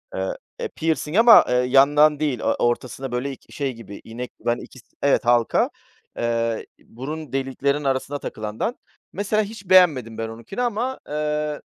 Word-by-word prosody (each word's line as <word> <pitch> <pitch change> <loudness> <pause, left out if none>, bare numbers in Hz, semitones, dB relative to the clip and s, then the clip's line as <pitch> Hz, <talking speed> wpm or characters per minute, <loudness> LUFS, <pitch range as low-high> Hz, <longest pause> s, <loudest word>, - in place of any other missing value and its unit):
eee, - - -2 0.2
eee, 475 - -2
pirsing 160 +2 -1
ama, 230 0 +8
ııı, 125 0 +2
yandan 145 +3 +5
değil, 145 -6 0
o - - -5
ortasında, 120 +2 -1
böyle, 125 +3 -2
ik 135 - -12
şey 140 -3 -2
gibi 105 -3 -11
inek, 120 +2 -7
ben, 120 0 +2
ikis 130 - -12 0.2
evet 140 -2 +2
halka, 120 -1 +3 0.5
eee, 115 -1 -1
burun 145 +4 -8
deliklerinin 135 +2 -1
arasına 135 +1 -1
takılandan, 110 - -4 0.4
mesela 210 +2 0
hiç 205 -3 -10
beğenmedim 150 -12 +5
ben 115 - -3
onunkini 115 - -6
ama, 245 +2 -1
eee, 150 0 -2
140 Hz, 155 wpm, -23 LUFS, 120-160 Hz, 0.5 s, ama